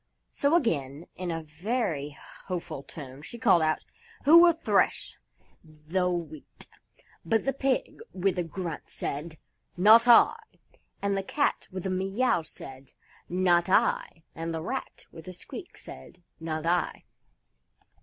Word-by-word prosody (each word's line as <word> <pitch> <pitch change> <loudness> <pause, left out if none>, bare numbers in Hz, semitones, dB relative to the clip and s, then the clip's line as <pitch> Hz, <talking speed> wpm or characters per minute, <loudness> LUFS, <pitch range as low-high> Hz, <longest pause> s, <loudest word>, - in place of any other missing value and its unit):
So, 285 +3 +2
again, 150 - 0
in 180 -1 -4
a 165 -1 -3
very 155 - -3 0.3
hopeful 170 -6 -4
tone, 140 -2 -10
she 235 - -9
called 195 -7 +4
out, 155 0 0 0.4
"Who 320 +4 +9
will 345 0 +7
thresh 330 - +1 0.5
the 160 +4 -2
Wheat?" 160 -4 -6 0.6
But 220 +7 +1
the 270 - +1
Pig, 270 -1 -1
with 185 0 0
a - - +1
grunt, 165 -1 -6
said, 155 +3 -4 0.4
"Not 220 +6 +7
I," 240 - +8 0.7
and 200 0 +1
the 195 - 0
Cat, 285 +9 -1
with 185 0 -6
a 190 - -1
meow, 195 +2 +1
said, 135 -3 -11 0.4
"Not 175 -1 +2
I," 170 -3 +1
and 165 0 -4
the 160 - -4
Rat, 260 +9 -5
with 165 0 -12
a 185 - -6
squeak, 175 - -10
said, 175 - -11 0.2
"Not 160 -1 -4
I." 175 +1 0
175 Hz, 140 wpm, -28 LUFS, 155-200 Hz, 0.7 s, Who